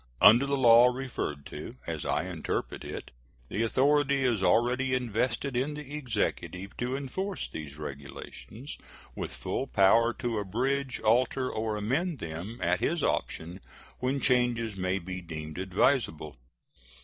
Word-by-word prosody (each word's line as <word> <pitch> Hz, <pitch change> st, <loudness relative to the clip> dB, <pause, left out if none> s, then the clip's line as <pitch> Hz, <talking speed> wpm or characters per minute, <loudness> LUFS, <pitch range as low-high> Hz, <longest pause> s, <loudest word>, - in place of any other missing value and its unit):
Under 120 Hz, +7 st, +8 dB
the 140 Hz, 0 st, +1 dB
law 120 Hz, -1 st, +8 dB
referred 125 Hz, -, -3 dB
to, -, -, -8 dB
as -, -, -4 dB
I -, -, +1 dB
interpret -, -, -3 dB
it, -, -, -7 dB, 0.4 s
the 105 Hz, -, -1 dB
authority 140 Hz, +3 st, +3 dB
is 120 Hz, -6 st, +2 dB
already 125 Hz, +7 st, +3 dB
invested 125 Hz, +2 st, -1 dB
in 135 Hz, +4 st, 0 dB
the 145 Hz, -1 st, -8 dB
Executive 105 Hz, -7 st, -2 dB
to 125 Hz, +2 st, -1 dB
enforce 190 Hz, +8 st, -3 dB
these 75 Hz, -2 st, -8 dB
regulations, 75 Hz, -, -8 dB, 0.4 s
with -, -, -4 dB
full 135 Hz, -, -3 dB
power 115 Hz, +2 st, +5 dB
to 120 Hz, -3 st, -2 dB
abridge, 130 Hz, +7 st, -1 dB
alter, 125 Hz, +3 st, +2 dB
or 110 Hz, -1 st, -2 dB
amend 140 Hz, -, 0 dB
them, 85 Hz, +4 st, -6 dB
at 90 Hz, +1 st, +2 dB
his 170 Hz, -2 st, 0 dB
option, 85 Hz, +4 st, -2 dB, 0.4 s
when 130 Hz, +2 st, 0 dB
changes 120 Hz, -4 st, +2 dB
may 95 Hz, 0 st, 0 dB
be 90 Hz, 0 st, -6 dB
deemed 80 Hz, -1 st, -7 dB
advisable. 95 Hz, -, +1 dB
120 Hz, 135 wpm, -29 LUFS, 95-130 Hz, 0.4 s, Under